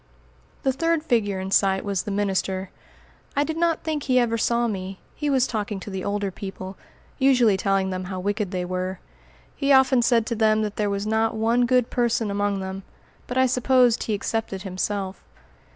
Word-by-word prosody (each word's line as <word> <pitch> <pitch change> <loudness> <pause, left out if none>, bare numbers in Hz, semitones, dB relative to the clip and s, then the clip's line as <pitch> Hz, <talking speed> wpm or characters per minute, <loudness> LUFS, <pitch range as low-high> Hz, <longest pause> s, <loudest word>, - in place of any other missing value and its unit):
The 265 - +2
third 330 +2 0
figure 205 -9 +1
in 190 +1 -5
sight 195 0 +2
was 200 -2 0
the - - -6
minister. 195 -1 -1 0.6
I 285 - +3
did 315 +1 -3
not 335 0 +1
think 310 -2 -2
he 255 -2 +1
ever 240 -2 +2
saw 235 +1 +1
me; 190 -2 -4 0.2
he 295 -1 -2
was 265 -3 +3
talking 210 -4 -3
to 200 - -8
the 190 -1 -4
older 200 -1 -1
people, 190 -1 -7 0.4
usually 250 -6 +4
telling 195 0 0
them 185 0 -4
how 185 0 -5
wicked 205 +1 -1
they 180 -1 -3
were. 185 +1 -3 0.6
He 280 0 0
often 265 -2 +5
said 230 -1 +3
to 235 - -2
them 215 0 +3
that 210 -1 -3
there 210 -1 +1
was 200 0 -2
not 220 +1 +1
one 230 +2 +2
good 250 -1 +2
person 235 -3 +1
among 200 -1 0
them; 190 0 -5 0.5
but 250 - -3
I 260 - +5
supposed 250 -1 +3
he 220 - -1
excepted 205 -2 -3
himself. 190 0 -3
210 Hz, 190 wpm, -24 LUFS, 195-245 Hz, 0.6 s, often